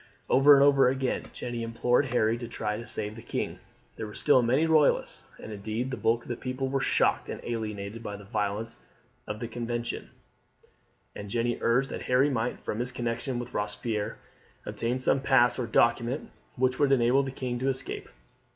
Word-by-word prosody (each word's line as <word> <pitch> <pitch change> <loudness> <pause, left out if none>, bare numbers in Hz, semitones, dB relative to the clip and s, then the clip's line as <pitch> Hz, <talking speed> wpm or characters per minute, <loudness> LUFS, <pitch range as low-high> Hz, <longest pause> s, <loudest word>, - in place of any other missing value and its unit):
Over 140 +2 +8
and 140 - +6
over 140 -2 +6
again 130 0 -2
Jeanne 120 - -6
implored 120 +3 +1
Harry 115 -2 +2
to 120 - -5
try 105 -2 -3
to 115 +1 -7
save 105 0 -3
the 115 - -9
king. - - -4 0.4
There 110 - -4
were 105 - -10
still 130 - +4
many 130 +7 +2
Royalists, 155 -3 +2
and - - -9
indeed 110 +5 -3
the - - -1
bulk 115 +1 +1
of - - -16
the 120 - -2
people 130 +2 -3
were 135 0 0
shocked - - +2
and - - -5
alienated 110 -2 -4
by 105 -3 -5
the 105 - -12
violence 105 +3 -3 0.5
of 105 0 -4
the 115 - -4
Convention; 120 0 -4 1.1
and 100 0 -7
Jeanne 120 +2 0
urged 125 +4 +2
that - - -5
Harry 130 +3 +4
might, 120 -1 -1
from 110 - -4
his 125 +1 -1
connection 125 +1 -3
with 120 0 -6
Robespierre, 105 +1 -2 0.5
obtain 120 +2 -2
some 130 +1 +2
pass 130 -2 +3
or 120 - -1
document 120 +4 +1 0.2
which 130 0 +1
would 145 -2 +3
enable 130 +1 +4
the 135 - -3
king 125 -2 -4
to 130 +2 +1
escape. 130 0 -4
120 Hz, 190 wpm, -28 LUFS, 115-130 Hz, 1.1 s, Over